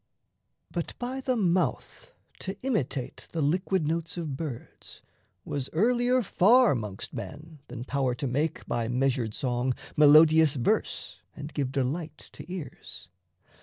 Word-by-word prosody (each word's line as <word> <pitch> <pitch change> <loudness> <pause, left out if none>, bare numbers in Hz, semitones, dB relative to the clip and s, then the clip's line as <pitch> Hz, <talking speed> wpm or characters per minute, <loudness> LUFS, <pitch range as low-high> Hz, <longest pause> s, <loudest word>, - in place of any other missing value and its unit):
But - - -4
by 255 +2 -4
the 255 -1 0
mouth 185 - -1 0.3
To 190 0 -5
imitate 155 - -2
the 165 - -1
liquid 180 +2 +1
notes 165 +2 -2
of 155 -5 -3
birds 140 -5 -8 0.4
Was 135 -2 -4
earlier 245 +7 +3
far 230 - +5
'mongst 105 -6 -5
men 155 0 -8
than 120 -1 -7
power 130 -2 0
to 130 - -4
make, 145 +5 -1
By 120 -1 -1
measured 125 -3 0
song, 125 -1 -1 0.2
melodious 155 0 +7
verse 120 -3 -1 0.2
and 145 +1 -8
give 135 -3 -1
Delight 145 +4 -2 0.2
to 175 - -10
ears. 180 -6 -8
155 Hz, 130 wpm, -28 LUFS, 130-180 Hz, 0.4 s, melodious